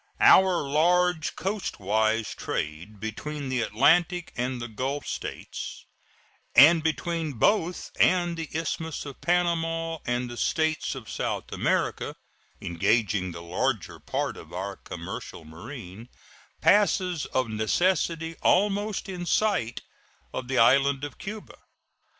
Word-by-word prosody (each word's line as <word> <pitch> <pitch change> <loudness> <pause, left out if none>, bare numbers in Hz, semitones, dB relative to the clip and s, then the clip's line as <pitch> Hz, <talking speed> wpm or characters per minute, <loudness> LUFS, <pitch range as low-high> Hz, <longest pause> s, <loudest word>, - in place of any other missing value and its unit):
Our 185 -6 +6
large 175 +3 +2
coastwise 110 - -1
trade 85 +8 -4
between 140 +7 -5
the 130 -2 0
Atlantic 170 - +2
and 125 +1 -2
the 120 - -4
Gulf 130 +6 -3
States - - -6 0.7
and 160 +3 +8
between 160 0 -1
both 180 - +1
and 175 -2 +3
the 165 -2 -5
Isthmus 160 0 -3
of 140 -2 -9
Panama 165 -2 0
and 120 +1 0
the 120 0 -8
States 160 0 0
of 125 -5 -9
South - - -3
America - - 0 0.4
(engaging 95 +1 +1
the 85 0 -8
larger 105 +5 -2
part - - -3
of - - -12
our 100 +2 -4
commercial 80 - -8
marine) 100 - -10 0.5
passes 185 -5 +3
of 130 -2 0
necessity 165 - 0
almost 205 +1 +2
in 180 -2 -5
sight 180 - +1 0.5
of 130 - -4
the 130 0 -1
island 135 +4 +4
of 145 - -6
Cuba. 210 +1 -8
145 Hz, 120 wpm, -27 LUFS, 115-175 Hz, 0.7 s, and